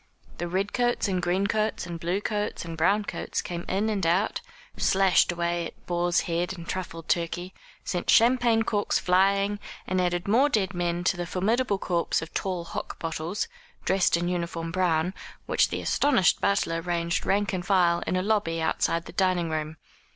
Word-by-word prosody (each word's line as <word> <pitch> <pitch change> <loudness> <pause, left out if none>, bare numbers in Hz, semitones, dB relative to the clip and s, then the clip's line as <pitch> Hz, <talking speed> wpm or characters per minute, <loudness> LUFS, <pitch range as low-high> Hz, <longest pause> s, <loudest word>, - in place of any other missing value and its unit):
The 175 - -2
red 190 +3 -1
coats 240 -2 +1
and 185 -2 0
green 180 +3 +1
coats, 215 -2 0
and 170 -1 -6
blue 175 +5 -1
coats 210 -4 -2
and 165 -1 -6
brown 200 +6 +2
coats, - - -3
came 175 -1 -4
in 200 +3 +1
and 205 -3 -1
out, 175 +6 +1 0.3
slashed 190 -2 +3
away 170 0 -1
at - - -16
boar's 175 0 +1
head 175 +2 -2
and 170 -1 -9
truffled 165 -3 -5
turkey, 175 +2 -1 0.3
sent 175 -2 -3
champagne 235 -1 +5
corks 205 -2 0
flying, 195 +2 +2 0.3
and 185 0 0
added 175 0 -1
more 250 +8 +4
dead 200 -7 0
men 175 0 -1
to 180 0 +1
the 175 -1 -3
formidable 205 +5 +1
corps 175 -3 0
of 160 - -8
tall 185 -3 -2
hock 170 - -6
bottles, 165 +4 -3 0.4
dressed 190 -3 +3
in 175 +1 -2
uniform 170 -2 -3
brown, 180 -1 +1 0.3
which - - +2
the - - -3
astonished 265 -10 +3
butler 165 -4 +1
ranged 170 0 -1
rank 200 0 +1
and 180 -1 -3
file 175 -3 +3
in - - 0
a 185 - 0
lobby 200 -6 0
outside 165 +1 0
the - - -9
dining 185 -4 +1
room. 155 0 -3
180 Hz, 180 wpm, -26 LUFS, 170-200 Hz, 0.4 s, champagne